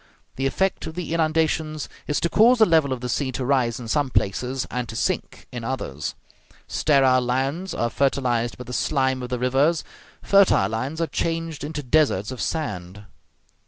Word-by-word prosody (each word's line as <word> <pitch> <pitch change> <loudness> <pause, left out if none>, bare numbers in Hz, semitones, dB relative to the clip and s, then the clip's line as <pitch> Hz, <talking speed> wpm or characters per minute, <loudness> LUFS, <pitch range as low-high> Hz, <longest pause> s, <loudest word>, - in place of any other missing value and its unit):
The 135 +1 0
effect 190 +4 -1
of 160 - -7
the 180 -2 -4
inundations 155 -2 0 0.2
is 150 - 0
to 170 - +2
cause 235 +8 +5
the 220 - +6
level 160 -6 +3
of 130 -2 -3
the 125 - -3
sea 130 +3 -1
to 130 - -3
rise 125 -3 +1
in 120 - -7
some 140 +4 +1
places 125 +4 -1
and 125 -1 -3
to 110 - -7
sink - - -2
in 120 -2 -6
others; 95 - -4 0.5
sterile 135 -4 +3
lands 135 +9 -1
are 120 0 -1
fertilized 125 -4 0
by 125 - -7
the 125 - -8
slime 130 -1 +1
of 125 - -5
the 125 - -1
rivers, 135 +6 +2 0.4
fertile 195 - +4
lands 130 +9 -3
are - - +2
changed 165 -3 -3
into 150 0 -4
deserts 130 -7 +2
of 130 - -6
sand. 100 - -4
135 Hz, 180 wpm, -23 LUFS, 125-160 Hz, 0.5 s, the